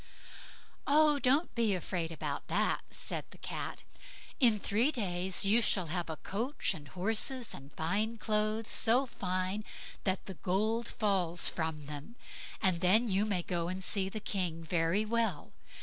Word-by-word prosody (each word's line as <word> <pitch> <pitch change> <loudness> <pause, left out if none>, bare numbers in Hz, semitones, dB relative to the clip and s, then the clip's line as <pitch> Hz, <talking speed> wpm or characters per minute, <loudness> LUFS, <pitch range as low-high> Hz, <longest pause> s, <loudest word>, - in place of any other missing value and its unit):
"Oh, 300 0 +5
don't 280 +6 +2
be 225 -4 +2
afraid 170 -2 -3
about 165 - -4
that", - - +1
said - - -4
the - - -15
Cat; - - -5 0.6
"in 235 -5 +5
three 225 +9 +2
days 190 - +2
you 215 +4 +5
shall 180 -7 +1
have 175 -2 -2
coach 235 +4 -1
and 150 -5 -10
horses, 225 - 0
and 135 +1 -10
fine 205 +8 0
clothes, 215 +1 0
so 240 +4 +4
fine 185 -2 -2 0.4
that 190 -1 -1
the 190 - -6
gold 215 - -1
falls 185 -5 +2
from 160 -2 -3
them, 150 +10 -8 0.5
and 185 -3 +3
then 215 +6 +4
you 195 +2 +2
may 190 -5 -1
go 170 -1 -2
and 185 +1 -3
see 190 0 +1
the 215 - -5
king 180 -5 -2
very 165 +5 +1
well. 220 -7 -1
195 Hz, 150 wpm, -32 LUFS, 175-225 Hz, 0.6 s, Oh